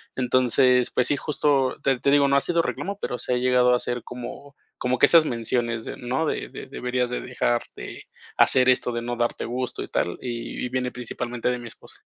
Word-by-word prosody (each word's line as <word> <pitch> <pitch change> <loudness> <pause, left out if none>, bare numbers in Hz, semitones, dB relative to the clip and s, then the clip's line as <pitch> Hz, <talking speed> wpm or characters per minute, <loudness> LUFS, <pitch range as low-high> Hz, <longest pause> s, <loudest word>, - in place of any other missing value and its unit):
Entonces, 125 0 +3
pues 125 - +2
sí, 145 - +2
justo 140 -3 +1
te 135 -2 +1
te 140 - +1
digo, 140 -1 +5
no 140 - +4
ha - - +3
sido 170 +2 +1
reclamo, 200 +3 -4
pero, 125 - -3
se 125 - -2
ha - - +2
llegado 125 0 +3
a 125 - 0
ser 120 -2 -3
como 125 +3 -9 0.2
como 125 +1 0
que - - +8
esas 165 -2 +7
menciones 120 -2 -1
de - - -6
no, 130 +6 -2
de - - -2
de - - -9
deberías 125 0 -2
de 125 - -2
dejar - - 0
de - - -9 0.3
hacer 130 0 +6
esto 125 -1 +2
de 120 - -2
no 120 +1 -3
darte 120 0 -1
gusto 125 +1 -4
y - - -8
tal, 85 - -1
y 120 -1 -5
y - - -4
viene 125 0 -1
principalmente 120 0 -4
de 125 0 -1
mi 120 - -8
esposa. - - -15
125 Hz, 220 wpm, -24 LUFS, 120-130 Hz, 0.3 s, que